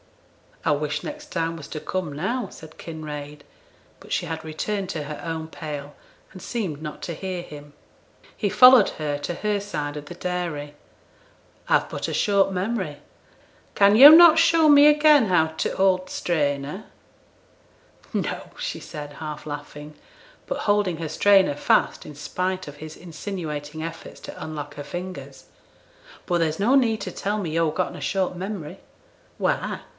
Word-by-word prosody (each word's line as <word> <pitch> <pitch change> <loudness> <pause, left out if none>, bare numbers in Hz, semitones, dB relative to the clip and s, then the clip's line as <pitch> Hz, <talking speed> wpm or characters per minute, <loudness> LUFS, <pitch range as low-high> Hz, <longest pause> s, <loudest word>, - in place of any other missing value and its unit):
'I - - +2
wish 145 0 -2
next 300 0 -7
time 165 -1 -1
was 150 - -9
to 155 - -5
come 175 -2 -4
now,' 200 - -2
said 160 0 -13
Kinraid; 150 -2 -8 0.6
but - - -15
she - - -1
had 160 0 -5
returned 190 +5 -3
to 155 -5 -3
her 150 0 -7
own 160 -1 -4
pail, 145 -3 -7 0.4
and 185 - -11
seemed 185 -11 -4
not 150 -1 -7
to 170 - -4
hear 185 +1 -4
him. 145 -3 -12 0.6
He 205 - -1
followed 250 -1 +8
her 145 -1 -1
to 145 +4 -4
her 210 +1 -1
side 150 -7 -4
of 145 - -7
the 160 - -8
dairy. 170 -5 -4 0.9
'I've - - +2
but - - -4
a - - -4
short 200 -2 +2
memory, 190 -5 -2 0.8
can 200 +1 +5
yo' 270 +6 +12
not 325 0 +9
show 330 -1 +5
me 290 0 +8
again 300 -3 +6
how 170 -4 +3
t' 160 0 -3
hold 185 -1 +1
t' - - -9
strainer?' 145 +2 -1 1.3
'No,' - - -3
said 155 - -6
she, - - -14
half 150 -1 -7
laughing, 145 0 -8 0.5
but - - -4
holding 205 -5 +2
her 160 -1 -4
strainer 195 -6 +4
fast - - +1
in 150 - -9
spite 185 +5 -3
of 145 0 -9
his 155 +1 -9
insinuating 155 -3 -6
efforts 165 0 -8
to - - -8
unlock 150 -2 -6
her 145 - -6
fingers. 180 +5 -8 0.8
'But 175 -2 +1
there's 160 0 0
no 235 +7 +3
need 225 -5 +2
to - - -4
tell 205 +2 -2
me 175 -6 -3
yo've 160 -1 0
getten 185 - -1
a - - -9
short 190 -2 -1
memory.' 185 -2 -6 0.6
'Why? - - -1
170 Hz, 165 wpm, -24 LUFS, 150-200 Hz, 1.3 s, yo